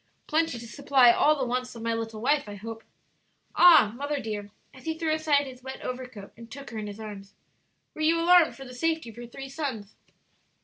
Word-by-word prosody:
"Plenty 320 -4 0
to 235 - -9
supply 265 -1 +4
all 300 +5 +4
the 265 - -1
wants 250 0 -3
of 230 - -8
my 230 0 0
little 225 -1 -5
wife, 285 -2 +1
I 205 - -7
hope." 225 +2 -8 0.7
"Ah, 315 -12 +7
mother 285 +2 -3
dear," 210 -4 -5 0.2
as 260 - -15
he 320 0 -2
threw 320 -1 0
aside 305 -2 +2
his 255 -2 -11
wet 265 +1 -8
overcoat 250 -5 -7
and 230 0 -13
took 275 +1 -10
her 225 - -5
in 210 - -5
his 205 +1 -8
arms, 205 -2 -9 0.6
"were 310 - -8
you 325 +2 +3
alarmed 345 -1 +5
for 270 - -10
the 250 - -10
safety 320 -1 -1
of 220 - -20
your 240 0 -8
three 270 +3 -9
sons?" 265 -8 -5
255 Hz, 215 wpm, -27 LUFS, 225-295 Hz, 0.7 s, Ah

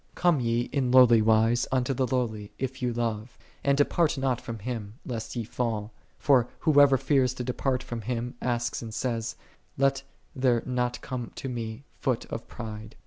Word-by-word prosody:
Come 175 -5 +3
ye 115 -1 +1
in 135 -3 0
lowly 125 -3 +7
wise 110 +2 +3
unto 130 0 +1
the 130 0 0
Lowly, 110 -5 -2
if 130 0 -4
ye 125 - +1
love: 115 -1 -3 0.3
and 140 0 +3
depart 155 +2 +2
not 130 -3 0
from 115 -3 -6
Him, 110 -1 -5
lest 115 -2 -5
ye 120 - -1
fall. 110 -2 -2 0.3
For 130 -4 +4
whoso 145 -3 +6
fears 130 -2 +2
to 125 - -4
depart 125 +1 -1
from 120 -1 -5
Him 120 +2 -3
asks 120 -1 -1
and 110 -2 -7
says, 115 -3 -2 0.2
" - - -39
Let 135 0 +2 0.3
there 125 -3 +2
not 125 -1 -1
come 125 -3 -5
to - - -5
me 115 0 -5 0.2
foot 130 -4 0
of 115 - -5
pride." 110 -1 -8
125 Hz, 180 wpm, -27 LUFS, 115-130 Hz, 0.3 s, lowly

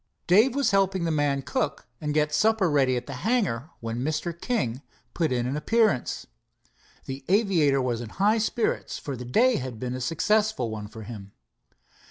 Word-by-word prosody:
Dave 220 +8 +5
was 280 -4 +2
helping 195 -2 +2
the 165 - 0
man 145 -2 +1
cook 145 +1 -2 0.3
get 150 0 +1
supper 215 0 +3
ready 135 -3 +3
at 120 - -4
the 140 - -7
hangar 190 - 0
when 115 +1 -3
Mr. 155 +4 -2
King 140 - -2 0.3
put 160 -4 0
in 120 -1 0
an 130 +3 -2
appearance. 215 - +1 0.8
The 135 0 -6
aviator 170 - +3
was 120 -2 -1
in 115 - -7
high 210 - +2
spirits, 220 +1 -1
for 140 - -5
the 125 0 -7
day 235 - +3
had 125 -4 -5
been 125 +1 -3
a 130 - -4
successful 205 - +1
one 105 -1 -5
for 110 +1 -10
him. 100 -3 -9
150 Hz, 175 wpm, -26 LUFS, 125-200 Hz, 0.8 s, Dave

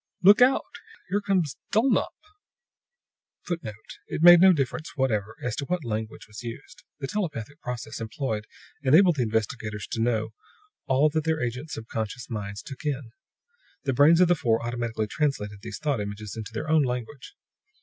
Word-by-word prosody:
"Look 205 +5 +8
out! 255 +2 +5 0.5
Here 205 +2 +1
comes 185 -8 0
Dulnop!" 235 +5 +2 1.3
[Footnote: 120 - -6
It - - -3
made 175 0 +10
no 190 0 +8
difference 155 0 -2
whatever 110 -5 0
as 125 -3 -1
to 140 - -2
what 180 -2 -2
language 110 -1 -4
was 110 0 -9
used. 120 +7 -9 0.2
The 140 - -4
telepathic 150 - -4
process 120 -2 -5
employed 110 -2 -3 0.3
enabled 160 +5 +5
the - - +1
investigators 110 -2 -2
to 115 - -1
know 110 -2 +1 0.6
all 135 +3 +4
that 155 +1 -1
their 160 0 0
agents' 125 +5 -3
subconscious 115 +2 -5
minds 100 -1 -5
took 135 - -9
in. 140 -5 -3 0.7
The 135 - 0
brains 150 +6 +6
of 180 - +6
the 175 - +5
four 115 -7 0
automatically 120 -2 -2
translated 105 -5 -2
these 115 - -6
thought 145 -7 -1
images 105 +1 -6
into 110 0 -6
their 115 +7 -4
own 155 0 +4
language. 125 - -4
125 Hz, 160 wpm, -26 LUFS, 110-155 Hz, 1.3 s, made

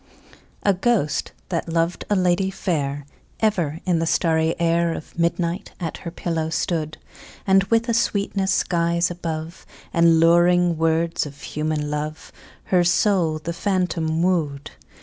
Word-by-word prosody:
A 200 - +4
ghost, 190 -6 0 0.2
that 170 -2 -2
loved 165 +1 -1
a 205 - +3
lady 185 0 +2
fair, 145 -7 -2 0.3
Ever 175 -8 0
in 175 -3 +2
the 165 - -1
starry 160 -1 +1
air 170 0 +2
Of - - -10
midnight 170 +1 -1
at 170 -3 -4
her 170 - -7
pillow 165 -2 -3
stood; 160 -2 -2 0.5
And, 195 0 +4
with 230 +3 +1
a 235 - +1
sweetness 200 -3 0
skies 170 -1 +1
above 165 -1 -5 0.3
The 170 - +1
luring 170 +1 +5
words 165 0 +1
of 140 0 -13
human 150 -1 -2
love, 150 +1 -4 0.3
Her 180 -2 +2
soul 175 -2 +2
the 165 +2 -5
phantom 175 -3 0
wooed. 155 -6 -1
170 Hz, 140 wpm, -22 LUFS, 160-180 Hz, 0.5 s, luring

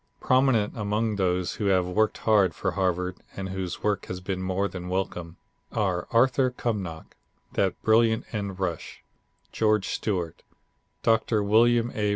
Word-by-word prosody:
Prominent 130 -5 +2
among 105 0 -1
those 90 -2 0
who 105 - -2
have 95 -2 +3
worked 105 +4 +1
hard 105 -4 +3
for 95 - -1
Harvard 90 -1 -1 0.2
and 95 -1 -4
whose 95 -2 -4
work 105 -1 0
has 90 - -5
been 95 0 -4
more 95 +2 0
than 90 -2 -7
welcome, 90 -2 -3 0.3
are 95 -5 -1
Arthur 130 +2 +3
Cumnock, 100 -10 -4 0.4
that - - 0
brilliant 110 0 +3
end 100 -3 -4
rush, 90 -4 -4 0.5
George 110 -3 +1
Stewart, 90 -6 -2 0.6
Doctor 110 -1 +2
William 115 +3 +4
A. 105 -1 0
100 Hz, 145 wpm, -26 LUFS, 90-110 Hz, 0.6 s, William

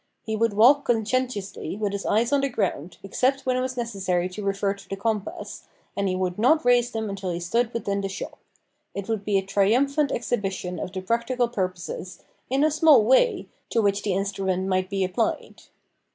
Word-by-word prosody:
He 220 - -2
would 225 0 +1
walk 255 +8 +6
conscientiously 225 -6 -1
with 210 -2 -1
his 200 0 -4
eyes 230 +5 +2
on 280 - +4
the 275 - 0
ground, 185 - -2
except 260 +7 0
when 255 -1 +1
it 255 - +1
was 255 0 -3
necessary 190 -7 -1
to 205 +3 -7
refer 195 0 0
to 200 -1 -15
the 195 - -2
compass, 210 0 -4 0.3
and 200 0 0
he 185 - -1
would 185 0 -2
not 280 +6 +4
raise 245 -1 +4
them 220 -2 -3
until 195 -2 -4
he 170 -1 -2
stood 230 +7 0
within 200 -4 -2
the 195 - -3
shop. 195 - -7 0.6
It 200 -1 -4
would 220 -3 -2
be 200 -1 +1
a 195 - 0
triumphant 265 +9 +2
exhibition 195 -7 -2
of 185 - -4
the 190 -1 -4
practical 235 +5 0
purposes, 185 -4 -4 0.3
in 270 +3 +2
a 310 - +3
small 305 -6 +6
way, 265 - +3 0.2
to 230 - +1
which 200 -2 +2
the 200 -3 -1
instrument 190 -1 -1
might 185 -1 0
be 195 -1 0
applied. 190 +5 -2
205 Hz, 195 wpm, -25 LUFS, 195-245 Hz, 0.6 s, walk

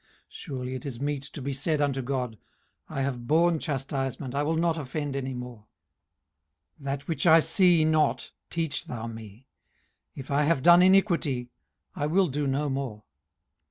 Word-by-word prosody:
18:034:031 - - -35 0.2
Surely 130 -2 -6
it 130 +1 -6
is 120 -4 -6
meet 145 0 -2
to 145 +1 -9
be 140 +1 -2
said 150 +3 0
unto 140 -2 0
God, 125 -4 -3 0.5
I 135 - -2
have 125 -3 -3
borne 165 +2 +3
chastisement, 135 -2 -3
I 140 - 0
will 155 +2 0
not 165 0 +1
offend 145 -1 -4
any 135 -1 -3
more: 125 -3 -9 1.1
18:034:032 140 - -14
That 140 0 -3
which 160 0 -1
I 165 0 +8
see 165 0 +4
not 155 -1 +1 0.2
teach 160 -3 -2
thou 115 -2 -6
me: 115 +1 -10 0.7
if 135 0 -8
I 140 +1 +3
have 150 -2 +1
done 175 +1 +8
iniquity, 170 -10 +3 0.4
I 145 - -1
will 180 +3 +2
do 145 +1 -2
no 140 +2 0
more. 135 -6 -4
140 Hz, 170 wpm, -27 LUFS, 130-160 Hz, 1.1 s, I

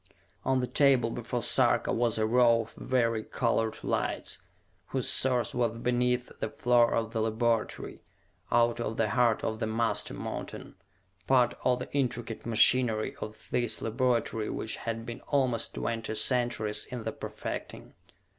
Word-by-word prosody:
On 130 0 +1
the - - 0
table 130 -5 +3
before 120 0 -3
Sarka - - +2
was 115 -1 +1
a 110 - +2
row 115 0 +4
of 115 - -10
vari 115 -3 0
colored 115 -3 0
lights, - - -2 0.5
whose - - -2
source 125 -4 +2
was 115 -2 0
beneath 125 +1 0
the - - -2
floor 120 -1 +3
of 115 -1 -1
the 115 -1 -1
laboratory, 115 +1 -1 0.5
out 120 0 +3
of 115 -1 -3
the 110 - +1
heart 120 -2 +2
of 110 0 -2
the 110 - -1
master 115 +1 0
mountain, - - -6 0.5
part 125 -2 +4
of 125 -1 +3
the - - -8
intricate 120 -5 -2
machinery 115 -1 +4
of 105 0 -8
this 120 -2 +1
laboratory 115 -2 0
which 110 - -2
had 115 0 -4
been 120 -1 -7
almost 130 -5 0
twenty 115 -1 -3
centuries 120 -3 0
in 125 -2 -6
the - - -2
perfecting. - - -7
115 Hz, 150 wpm, -29 LUFS, 115-125 Hz, 0.5 s, row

